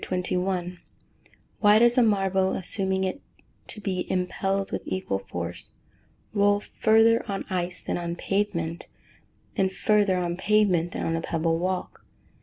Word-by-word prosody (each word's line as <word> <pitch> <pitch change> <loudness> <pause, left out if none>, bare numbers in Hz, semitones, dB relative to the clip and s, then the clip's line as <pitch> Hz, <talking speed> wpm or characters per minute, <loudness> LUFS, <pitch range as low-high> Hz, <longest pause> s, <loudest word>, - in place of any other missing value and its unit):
_Why 180 -1 -2 1.0
does 240 +1 +5
a 250 - +5
marble, 195 -3 +2
assuming 190 0 -1
it 190 +9 -3 0.5
to - - -6
be 190 -3 -3
impelled 195 +2 -1
with - - -2
equal 185 - -2
force, 85 -2 -6 0.6
roll 205 -1 +3
further 225 +2 +3
on 195 - -3
ice 180 -1 -2
than - - -2
on 170 0 -3
pavement, 175 -4 -2 0.7
and 190 -1 +1
further 205 -1 +2
on 175 -1 -2
pavement 190 -4 +2
than - - -3
on 165 - 0
a 165 - -2
pebble 165 0 0
walk? 185 +1 -3
190 Hz, 135 wpm, -26 LUFS, 175-205 Hz, 1.0 s, does